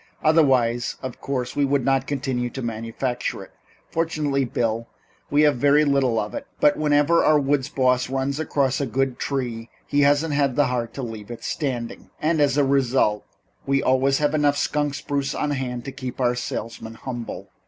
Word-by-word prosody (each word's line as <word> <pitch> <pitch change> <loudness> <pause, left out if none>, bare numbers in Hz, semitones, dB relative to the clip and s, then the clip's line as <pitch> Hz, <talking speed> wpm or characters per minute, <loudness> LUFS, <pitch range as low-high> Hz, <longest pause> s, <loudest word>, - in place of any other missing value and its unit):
Otherwise, 130 -7 +3
of 130 -2 -6
course, 130 -3 -3
we 145 - +2
would 140 -2 +1
not 135 -1 +2
continue 130 -3 -2
to 135 +1 -6
manufacture 115 +2 -3
it. - - -16 0.4
Fortunately, 155 -4 0
Bill, 115 -2 -1 0.4
we 145 +1 +4
have 150 -4 +4
very 145 +3 +4
little 135 -5 +2
of - - -2
it, 280 -1 -6
but 295 0 +4
whenever 150 +2 +3
our 155 - +5
woods 140 -1 0
boss 125 -1 +1
runs 135 +2 -1
across 140 -3 0
a 140 - -1
good 130 +1 -1
tree 120 -4 -3 0.2
he 145 - +1
hasn't 145 -2 +2
the 145 - +4
heart 120 -2 -2
to 135 - -4
leave 110 -3 -7
it 120 - -8
standing, 125 -6 -4
and 155 0 +1
as 145 -1 +3
a 145 - +4
result, 130 -6 +2 0.4
we 135 0 +2
always 135 +1 +3
have 150 0 +1
enough 145 -2 +2
skunk 145 -1 0
spruce 140 -1 -2
on 150 - -1
hand 125 -3 -3
to 135 - -5
keep 130 -1 -7
our 125 -1 +2
salesmen 115 -2 -5
humble." 120 -1 -6
135 Hz, 180 wpm, -23 LUFS, 125-145 Hz, 0.4 s, our